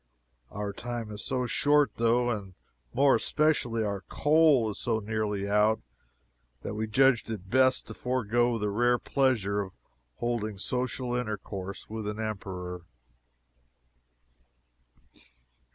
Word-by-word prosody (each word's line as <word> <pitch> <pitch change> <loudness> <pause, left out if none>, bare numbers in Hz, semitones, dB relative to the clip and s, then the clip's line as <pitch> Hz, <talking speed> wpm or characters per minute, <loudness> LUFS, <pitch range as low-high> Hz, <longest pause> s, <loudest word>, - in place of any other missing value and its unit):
Our 100 0 -4
time 120 -1 -5
is 105 0 -6
so 130 -2 -1
short, 145 +1 +3
though, 120 +1 +2
and 100 -5 -5 0.4
more 140 +1 +4
especially 120 -3 +1
our 100 -2 -2
coal 145 -4 +3
is - - -9
so 115 -3 0
nearly 105 -2 -2
out, 105 +2 +3 0.8
that - - -4
we 110 +1 -2
judged 130 +1 +3
it 100 -4 -6
best 130 0 +4
to - - -8
forego 120 -1 0
the 105 -2 -1
rare 120 +3 +3
pleasure 115 -8 +1
of 95 -2 -7 0.4
holding 110 - -2
social 125 +3 -2
intercourse 100 -5 -5
with 110 -1 -5
an 105 +1 -4
Emperor. 95 -4 -5
110 Hz, 120 wpm, -29 LUFS, 105-125 Hz, 0.8 s, more